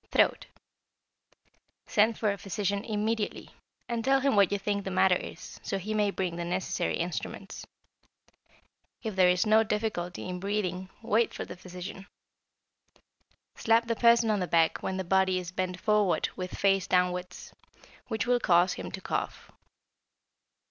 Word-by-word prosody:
=Throat.= -, -, +2 dB, 1.4 s
Send 220 Hz, +2 st, +2 dB
for 215 Hz, -2 st, +1 dB
a 200 Hz, -, -4 dB
physician 200 Hz, +2 st, -2 dB
immediately, 215 Hz, -1 st, -2 dB, 0.4 s
and 235 Hz, -1 st, -2 dB
tell 270 Hz, +2 st, +4 dB
him 275 Hz, -1 st, +2 dB
what 200 Hz, -2 st, +5 dB
you 205 Hz, -, +1 dB
think 200 Hz, 0 st, -2 dB
the 190 Hz, -, -4 dB
matter 185 Hz, 0 st, +4 dB
is, -, -, -8 dB
so 195 Hz, -, -2 dB
he 205 Hz, +3 st, -4 dB
may 210 Hz, -1 st, +2 dB
bring 185 Hz, -3 st, -3 dB
the 170 Hz, -, -3 dB
necessary 180 Hz, 0 st, -1 dB
instruments. 175 Hz, +1 st, -5 dB, 1.4 s
If 220 Hz, -4 st, -4 dB
there 185 Hz, -1 st, +5 dB
is 180 Hz, +2 st, +2 dB
no 215 Hz, +1 st, +5 dB
difficulty 210 Hz, -6 st, -3 dB
in 180 Hz, 0 st, -4 dB
breathing, 190 Hz, -2 st, -2 dB
wait 225 Hz, +1 st, +1 dB
for -, -, -4 dB
the -, -, -8 dB
physician. 185 Hz, +2 st, -9 dB, 1.5 s
Slap 230 Hz, +1 st, +3 dB
the 230 Hz, 0 st, -1 dB
person 235 Hz, -1 st, +4 dB
on 210 Hz, -, +1 dB
the 180 Hz, -, -1 dB
back 165 Hz, -1 st, +2 dB
when 190 Hz, -, -3 dB
the 190 Hz, -, -2 dB
body 190 Hz, +1 st, +2 dB
is 180 Hz, -1 st, -5 dB
bent 185 Hz, 0 st, -3 dB
forward 210 Hz, -4 st, +2 dB
with 185 Hz, 0 st, -5 dB
face 195 Hz, -2 st, +2 dB
downwards, 180 Hz, 0 st, -1 dB, 0.5 s
which 220 Hz, -2 st, -2 dB
will 245 Hz, 0 st, +2 dB
cause 175 Hz, -3 st, +4 dB
him -, -, -6 dB
to -, -, -5 dB
cough. -, -, -4 dB
195 Hz, 155 wpm, -29 LUFS, 180-215 Hz, 1.5 s, what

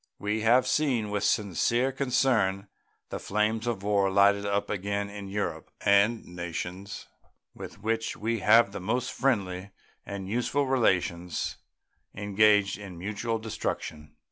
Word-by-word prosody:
We 105 Hz, +2 st, -2 dB
have 120 Hz, +4 st, +4 dB
seen 125 Hz, -9 st, +1 dB
with 105 Hz, -1 st, -1 dB
sincere 115 Hz, +6 st, +1 dB
concern 125 Hz, -7 st, +1 dB, 0.4 s
the -, -, -4 dB
flames 110 Hz, +3 st, 0 dB
of 110 Hz, -5 st, -2 dB
war 100 Hz, -1 st, +2 dB
lighted 100 Hz, +1 st, +4 dB
up 100 Hz, 0 st, 0 dB
again 100 Hz, +1 st, -2 dB
in 100 Hz, -1 st, -7 dB
Europe, 105 Hz, +2 st, -3 dB
and 100 Hz, +3 st, +3 dB
nations 90 Hz, +3 st, -6 dB, 0.5 s
with 100 Hz, -, -10 dB
which 115 Hz, +1 st, -1 dB
we 115 Hz, +1 st, -1 dB
have 110 Hz, +1 st, +5 dB
the 100 Hz, -, -6 dB
most 120 Hz, +7 st, -1 dB
friendly 100 Hz, -7 st, -1 dB, 0.3 s
and 100 Hz, -1 st, -6 dB
useful 125 Hz, +6 st, 0 dB
relations 90 Hz, -9 st, 0 dB, 0.6 s
engaged 105 Hz, 0 st, +3 dB
in 95 Hz, -4 st, -9 dB
mutual 105 Hz, +5 st, -2 dB
destruction. 80 Hz, -8 st, -5 dB
105 Hz, 130 wpm, -28 LUFS, 100-115 Hz, 0.6 s, have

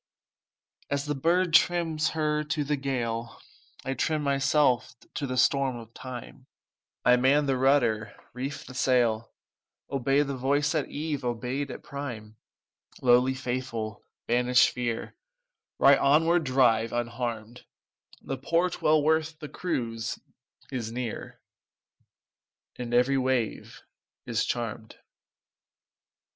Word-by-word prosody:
As 140 Hz, 0 st, -1 dB
the 150 Hz, -, -1 dB
bird 170 Hz, +5 st, +1 dB
trims 165 Hz, -2 st, +3 dB
her 150 Hz, -1 st, +1 dB
to 150 Hz, 0 st, -1 dB
the 145 Hz, +1 st, 0 dB
gale, 120 Hz, -4 st, -3 dB, 0.5 s
I 135 Hz, -, -1 dB
trim 155 Hz, +2 st, -1 dB
myself 135 Hz, -3 st, +2 dB, 0.2 s
to 140 Hz, -, -3 dB
the 130 Hz, 0 st, -3 dB
storm 135 Hz, 0 st, +2 dB
of 115 Hz, -1 st, -10 dB
time, 130 Hz, +1 st, -9 dB, 0.6 s
I 125 Hz, +1 st, +6 dB
man 140 Hz, +4 st, +3 dB
the 135 Hz, -1 st, +1 dB
rudder, 125 Hz, -5 st, +2 dB, 0.2 s
reef 135 Hz, +3 st, -5 dB
the 130 Hz, -, -10 dB
sail, 120 Hz, -3 st, +1 dB, 0.6 s
Obey 135 Hz, +1 st, +2 dB
the 140 Hz, -1 st, -4 dB
voice 140 Hz, +3 st, +1 dB
at 155 Hz, -3 st, -1 dB
eve 150 Hz, -2 st, -3 dB
obeyed 125 Hz, +4 st, -2 dB
at -, -, -8 dB
prime: 120 Hz, -7 st, -7 dB, 0.6 s
"Lowly 125 Hz, +1 st, +4 dB
faithful, 120 Hz, -4 st, -4 dB, 0.2 s
banish 125 Hz, +1 st, +4 dB
fear, 120 Hz, -2 st, -3 dB, 0.6 s
Right 135 Hz, 0 st, +6 dB
onward 160 Hz, +4 st, +3 dB
drive 115 Hz, -4 st, +3 dB
unharmed; 120 Hz, -1 st, -4 dB, 0.6 s
The 135 Hz, -1 st, -4 dB
port, 170 Hz, +6 st, 0 dB
well 155 Hz, -1 st, +4 dB
worth 160 Hz, +1 st, +1 dB
the 150 Hz, -2 st, -8 dB
cruise, 115 Hz, -10 st, -3 dB, 0.5 s
is 120 Hz, -4 st, -3 dB
near, 120 Hz, -2 st, -5 dB, 1.4 s
And 120 Hz, -1 st, -6 dB
every 125 Hz, +3 st, +3 dB
wave 130 Hz, -3 st, -2 dB, 0.4 s
is -, -, 0 dB
charmed." -, -, -4 dB
130 Hz, 120 wpm, -27 LUFS, 120-145 Hz, 1.4 s, I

